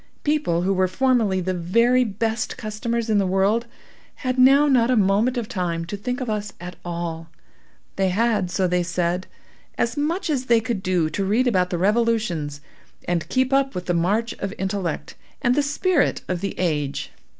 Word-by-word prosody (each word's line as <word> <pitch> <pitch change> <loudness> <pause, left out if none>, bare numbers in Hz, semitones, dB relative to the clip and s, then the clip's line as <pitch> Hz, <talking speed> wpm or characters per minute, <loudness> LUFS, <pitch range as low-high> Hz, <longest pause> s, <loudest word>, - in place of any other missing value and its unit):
People 290 - +1
who 195 +2 +2
were 185 0 +2
formerly, 220 -3 +1
the 185 +1 -1
very 230 +9 +3
best 225 +2 -2
customers 230 +2 -3
in 215 -2 +3
the 195 - +1
world, 200 +5 +1 0.5
had 255 -1 -2
now 275 +3 +6
not 250 -4 +3
a 255 - +3
moment 210 +5 +2
of 235 -3 -2
time 170 -4 -2
to 175 - -5
think 250 +5 -3
of 255 - -4
us 210 -2 -2
at 180 +1 -8
all. 170 -1 -5 0.7
They 190 -1 +2
had, 215 -1 +1
so 185 +1 +1
they 180 0 +1
said, 175 +1 -1 0.5
as 235 0 0
much 315 +6 -1
as 275 -5 -1
they 235 -2 +4
could 225 -3 -3
do 180 -4 +1
to 195 - -1
read 215 +7 +2
about 185 -7 +2
the 175 - -2
revolutions, 195 -8 0 0.5
and 175 -2 -1
keep 260 +1 +1
up 275 0 +2
with 180 0 -4
the 175 - 0
march 205 +7 +1
of 195 +1 -4
intellect 190 -4 -3 0.3
and 245 - +2
the 290 - +2
spirit 290 +3 +1
of 180 -1 -2
the 200 - -4
age. 150 -6 -1
205 Hz, 185 wpm, -23 LUFS, 180-240 Hz, 0.7 s, now